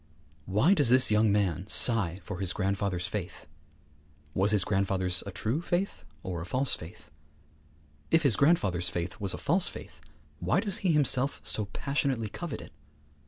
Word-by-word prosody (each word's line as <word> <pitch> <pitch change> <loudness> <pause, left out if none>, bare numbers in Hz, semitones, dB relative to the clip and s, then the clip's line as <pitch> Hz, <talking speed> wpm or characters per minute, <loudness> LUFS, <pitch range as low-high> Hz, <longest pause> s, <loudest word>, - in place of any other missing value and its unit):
Why 105 - +3
does 145 -11 +3
this 130 -2 +5
young 105 0 +3
man 95 -3 0
sigh 100 -7 +3
for 105 -5 -7
his 95 -2 +1
grandfather's 100 -3 -2
faith? 95 -3 -6 0.9
Was 95 +2 +1
his 105 -3 +4
grandfather's 95 -2 0
a - - -5
true 115 - -2
faith 175 - -2 0.2
or 90 -3 -4
a - - -6
false 130 +5 0
faith? 75 -3 -9 1.0
If 165 0 +3
his 140 -6 +4
grandfather's 100 - +2
faith 90 +5 -5
was 100 -2 -2
a - - -7
false 175 +5 +1
faith, - - -10 0.4
why - - +1
does 205 -1 0
he 185 -5 +1
himself 140 -2 +2
so 105 - -1
passionately 130 0 -2
covet 170 - -6
it? - - -12
105 Hz, 165 wpm, -28 LUFS, 95-140 Hz, 1.0 s, this